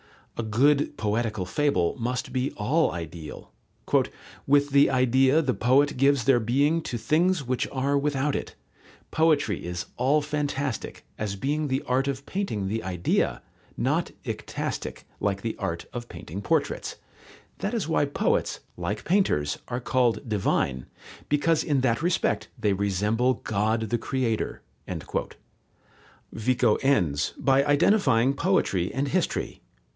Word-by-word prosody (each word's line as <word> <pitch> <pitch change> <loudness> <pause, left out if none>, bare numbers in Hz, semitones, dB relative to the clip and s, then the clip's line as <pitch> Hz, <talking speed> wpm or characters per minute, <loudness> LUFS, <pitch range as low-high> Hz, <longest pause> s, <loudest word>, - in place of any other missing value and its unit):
A 115 - -3
good 140 +7 +2
poetical 110 -2 -1
fable 140 - +1
must 125 +2 -3
be 130 +1 0
all 150 +10 +1
ideal: 80 -2 -8 1.0
"With 145 0 +4
the 140 +1 +5
idea 130 +4 +3
the 130 -3 +1
poet 135 +6 +3
gives 140 0 +3
their 130 -1 +4
being 140 +8 +2
to 125 - -4
things 165 +6 +2
which 125 0 -1
are 140 +1 0
without 140 0 0
it. - - -5 0.6
Poetry 160 -2 +2
is 85 0 -4
all 140 +4 +2
fantastic, 145 -5 -3
as 105 -2 -2
being 145 +8 -1
the 130 0 -1
art 130 +2 0
of 140 0 -3
painting 185 - -2
the 110 +3 -2
idea, 90 -2 0 0.3
not - - 0 0.2
icastic, - - -4 0.2
like 100 -1 -1
the 115 - -2
art 85 0 -3
of 120 -1 -6
painting 95 +6 -7
portraits. 100 - -1 0.6
That - - -2
is - - -1
why - - +2
poets, - - 0 0.2
like 105 +1 -3
painters, 165 - +1
are 120 0 -3
called 125 -1 +1
divine, 80 - 0 0.4
because 150 +2 +2
in 140 -3 +1
that 120 0 +1
respect 175 +1 0
they 105 - +1
resemble 105 +6 +1
God 110 +1 -1
the 120 - +1
Creator." 120 -4 -2 1.7
Vico 115 -1 +2
ends 90 - +1
by 135 +1 +3
identifying 140 - +3
poetry 140 - +1
and 140 +2 -1
history. - - -1
130 Hz, 135 wpm, -26 LUFS, 110-145 Hz, 1.7 s, the